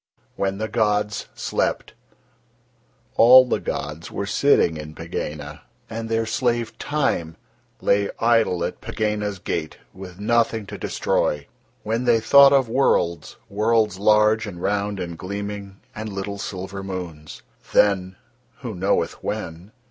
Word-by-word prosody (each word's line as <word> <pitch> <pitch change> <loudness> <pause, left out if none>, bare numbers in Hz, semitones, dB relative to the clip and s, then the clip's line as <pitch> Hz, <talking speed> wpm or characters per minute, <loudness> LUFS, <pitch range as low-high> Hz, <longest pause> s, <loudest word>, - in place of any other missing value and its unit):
WHEN 100 0 -1
THE 110 +1 -2
GODS 105 -2 0
SLEPT - - -2 1.2
All 130 +3 +9
the - - 0
gods 75 +3 -5
were 100 - -4
sitting 100 - +3
in 75 0 -8
Pegāna, 75 0 -6 0.3
and 115 0 -5
Their 115 0 +1
slave, 120 0 -1
Time, 85 - -1 0.4
lay 100 0 +2
idle 115 -7 +2
at - - -4
Pegāna's 105 -2 -2
gate 80 -3 -4 0.2
with 95 -1 -10
nothing 115 0 +1
to - - -8
destroy, 75 -1 -1 0.4
when 115 +3 -1
They 120 -2 +4
thought 140 +5 +7
of 135 -3 +4
worlds, 85 - +1
worlds 105 -1 +1
large 105 +1 +4
and 90 -4 -8
round 100 +1 -1
and 85 -2 -5
gleaming, 100 0 -6
and 110 0 -6
little 100 +1 -5
silver 95 0 -5
moons. 90 -6 -7 0.3
Then 95 -2 +3 0.5
(who 120 -4 -5
knoweth 95 +2 -1
when?) 85 +5 -5
100 Hz, 130 wpm, -23 LUFS, 90-115 Hz, 1.2 s, All